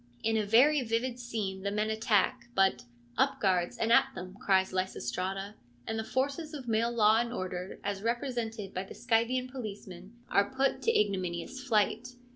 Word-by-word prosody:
In 225 Hz, 0 st, +1 dB
a 215 Hz, -2 st, 0 dB
very 270 Hz, +7 st, +5 dB
vivid 240 Hz, +1 st, -1 dB
scene 215 Hz, -6 st, -4 dB
the 200 Hz, -, -1 dB
men 210 Hz, +2 st, 0 dB
attack, 220 Hz, +3 st, +1 dB
but, 195 Hz, 0 st, +2 dB
' 120 Hz, 0 st, -29 dB
Up -, -, +2 dB
guards, 180 Hz, -3 st, +1 dB
and 225 Hz, -, 0 dB
at 235 Hz, -, +6 dB
them! 185 Hz, +1 st, -7 dB
' -, -, -20 dB
cries 190 Hz, -1 st, +3 dB
Lysistrata; 190 Hz, +3 st, -2 dB, 0.3 s
and 225 Hz, -, -2 dB
the -, -, -2 dB
forces 280 Hz, +6 st, -2 dB
of 265 Hz, -4 st, -8 dB
male 225 Hz, +1 st, +2 dB
law 220 Hz, -1 st, +4 dB
and 235 Hz, 0 st, -1 dB
order, 185 Hz, -4 st, -5 dB
as 200 Hz, -1 st, -3 dB
represented 230 Hz, -3 st, -2 dB
by 185 Hz, -, -2 dB
the 195 Hz, -, -11 dB
Scythian 245 Hz, +2 st, +1 dB
policemen, 205 Hz, -5 st, -8 dB
are 200 Hz, 0 st, +2 dB
put 265 Hz, +2 st, 0 dB
to 460 Hz, -, +3 dB
ignominious 190 Hz, +4 st, -2 dB
flight. 235 Hz, +1 st, 0 dB
220 Hz, 180 wpm, -30 LUFS, 195-240 Hz, 0.3 s, at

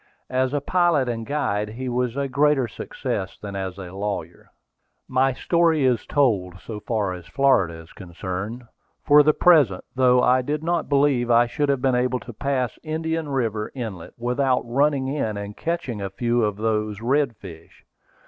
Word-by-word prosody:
As 130 Hz, 0 st, +1 dB
a 145 Hz, 0 st, -1 dB
pilot 170 Hz, -5 st, +2 dB
and 115 Hz, -2 st, -3 dB
guide 105 Hz, -8 st, -1 dB
he 125 Hz, +4 st, -6 dB
was 125 Hz, 0 st, -1 dB
a 140 Hz, 0 st, 0 dB
greater 140 Hz, -1 st, +2 dB
success 105 Hz, -, -5 dB
than 100 Hz, -1 st, -7 dB
as 95 Hz, -1 st, -4 dB
a 90 Hz, -2 st, -8 dB
lawyer. 100 Hz, +1 st, -5 dB, 0.6 s
My 130 Hz, +1 st, +2 dB
story 165 Hz, +1 st, +2 dB
is 125 Hz, -3 st, +1 dB
told, 95 Hz, -11 st, +1 dB
so 110 Hz, +1 st, -7 dB
far 105 Hz, -4 st, -1 dB
as 90 Hz, -2 st, -10 dB
Florida 130 Hz, -12 st, +2 dB
is 80 Hz, 0 st, -13 dB
concerned, 95 Hz, +5 st, -6 dB, 0.4 s
for 150 Hz, 0 st, +7 dB
the 150 Hz, +1 st, +3 dB
present, 145 Hz, -, +4 dB
though 125 Hz, -1 st, +4 dB
I 130 Hz, +1 st, +4 dB
did 150 Hz, +4 st, -3 dB
not 170 Hz, 0 st, -1 dB
believe 140 Hz, -4 st, +2 dB
I 120 Hz, 0 st, +5 dB
should 140 Hz, +1 st, 0 dB
be 135 Hz, -, +4 dB
able 125 Hz, 0 st, +1 dB
to 120 Hz, -, -9 dB
pass 130 Hz, 0 st, -2 dB
Indian 160 Hz, 0 st, -3 dB
River 115 Hz, -6 st, -1 dB
Inlet 110 Hz, -9 st, -6 dB
without 125 Hz, +2 st, +1 dB
running 135 Hz, +2 st, +1 dB
in 135 Hz, -7 st, -2 dB
and 100 Hz, 0 st, -6 dB
catching 160 Hz, -11 st, -3 dB
a 100 Hz, -, -3 dB
few 120 Hz, +3 st, 0 dB
of 105 Hz, -1 st, -1 dB
those 105 Hz, -1 st, -1 dB
redfish. 115 Hz, -, -3 dB
125 Hz, 165 wpm, -23 LUFS, 105-140 Hz, 0.6 s, for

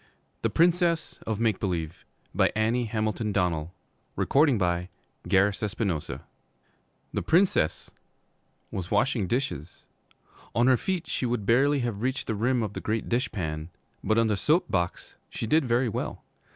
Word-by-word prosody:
THE -, -, +1 dB
PRINCESS 170 Hz, -1 st, +2 dB
OF 110 Hz, -2 st, -1 dB
MAKE 110 Hz, -4 st, +1 dB
BELIEVE 85 Hz, -5 st, -3 dB, 0.3 s
ANNIE 115 Hz, +3 st, +2 dB
HAMILTON 110 Hz, 0 st, -1 dB
DONNELL 85 Hz, -4 st, 0 dB, 0.4 s
THE 95 Hz, -, +2 dB, 2.4 s
Princess 170 Hz, -, +2 dB, 0.8 s
was 90 Hz, -2 st, -4 dB
washing 105 Hz, -1 st, +1 dB
dishes. 90 Hz, -, -3 dB, 0.7 s
On 120 Hz, -, +4 dB
her 130 Hz, -1 st, +5 dB
feet 185 Hz, +2 st, -2 dB
she 125 Hz, -, -1 dB
would 120 Hz, -4 st, -2 dB
barely 135 Hz, +5 st, +3 dB
have 115 Hz, -4 st, -3 dB
reached 130 Hz, +2 st, -1 dB
the -, -, -2 dB
rim 120 Hz, +3 st, +1 dB
of 105 Hz, -2 st, -4 dB
the -, -, -5 dB
great 110 Hz, +1 st, -2 dB
dish 125 Hz, +3 st, 0 dB
pan, 80 Hz, -5 st, -4 dB, 0.3 s
but 110 Hz, -, +2 dB
on 115 Hz, -, +4 dB
the 110 Hz, -2 st, +1 dB
soap 155 Hz, -, +2 dB
box 85 Hz, -3 st, -2 dB, 0.2 s
she -, -, -4 dB
did 155 Hz, +6 st, +3 dB
very 120 Hz, +1 st, +2 dB
well. 110 Hz, -, -4 dB
115 Hz, 135 wpm, -27 LUFS, 100-130 Hz, 2.4 s, her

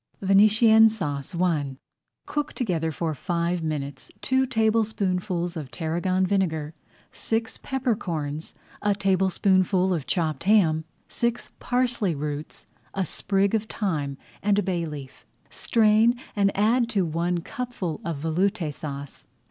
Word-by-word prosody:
VENETIENNE 215 Hz, +3 st, +6 dB
SAUCE 150 Hz, -9 st, -4 dB
I 150 Hz, -7 st, 0 dB, 0.5 s
Cook 295 Hz, 0 st, -2 dB
together 170 Hz, -, -1 dB
for 160 Hz, +1 st, -2 dB
five 170 Hz, +3 st, -1 dB
minutes 145 Hz, -4 st, -4 dB
two 260 Hz, 0 st, +1 dB
tablespoonfuls 205 Hz, -6 st, 0 dB
of 150 Hz, -5 st, -5 dB
tarragon 180 Hz, +5 st, 0 dB
vinegar, 165 Hz, -6 st, 0 dB, 0.4 s
six 225 Hz, 0 st, -2 dB
pepper 260 Hz, -4 st, -1 dB
corns, 155 Hz, -7 st, -4 dB, 0.3 s
a 205 Hz, -1 st, +2 dB
tablespoonful 190 Hz, -1 st, +2 dB
of 155 Hz, -6 st, -3 dB
chopped 160 Hz, -3 st, -1 dB
ham, 165 Hz, -7 st, +4 dB, 0.2 s
six 235 Hz, 0 st, -2 dB
parsley 245 Hz, -8 st, 0 dB
roots, 145 Hz, +1 st, -5 dB, 0.3 s
a 190 Hz, -1 st, 0 dB
sprig 195 Hz, +4 st, 0 dB
of 220 Hz, -1 st, +1 dB
thyme 155 Hz, -11 st, -2 dB, 0.2 s
and 205 Hz, 0 st, +2 dB
a 205 Hz, -, +2 dB
bay 175 Hz, -3 st, -1 dB
leaf. 140 Hz, -3 st, -9 dB, 0.3 s
Strain, 225 Hz, +1 st, +3 dB, 0.2 s
and 200 Hz, -1 st, +3 dB
add 230 Hz, +3 st, +3 dB
to 200 Hz, -6 st, +1 dB
one 170 Hz, +2 st, -1 dB
cupful 235 Hz, -6 st, -4 dB
of 165 Hz, -3 st, -3 dB
Veloute 175 Hz, 0 st, 0 dB
Sauce. 140 Hz, -1 st, -7 dB
185 Hz, 125 wpm, -25 LUFS, 160-215 Hz, 0.5 s, VENETIENNE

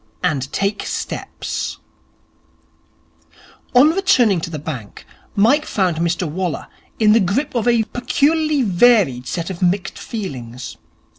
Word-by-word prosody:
And 135 Hz, -2 st, -1 dB
Take 200 Hz, +1 st, -1 dB
Steps -, -, -4 dB, 2.0 s
On 280 Hz, +5 st, +7 dB
returning 260 Hz, -, +3 dB
to 165 Hz, -, -4 dB
the 160 Hz, -, -5 dB
bank, 135 Hz, -8 st, -7 dB, 0.3 s
Mike 235 Hz, +9 st, +3 dB
found 185 Hz, -5 st, 0 dB
Mr 170 Hz, +1 st, 0 dB
Waller 175 Hz, +2 st, -3 dB, 0.3 s
in 215 Hz, -2 st, +4 dB
the 230 Hz, -, +5 dB
grip 200 Hz, +9 st, 0 dB
of 235 Hz, -2 st, -1 dB
a 235 Hz, -2 st, +4 dB
peculiarly 295 Hz, +5 st, +1 dB
varied 185 Hz, -, +3 dB
set 170 Hz, +1 st, -3 dB
of 180 Hz, -, -8 dB
mixed 185 Hz, +2 st, 0 dB
feelings. 130 Hz, -, -6 dB
195 Hz, 125 wpm, -19 LUFS, 165-245 Hz, 2.0 s, On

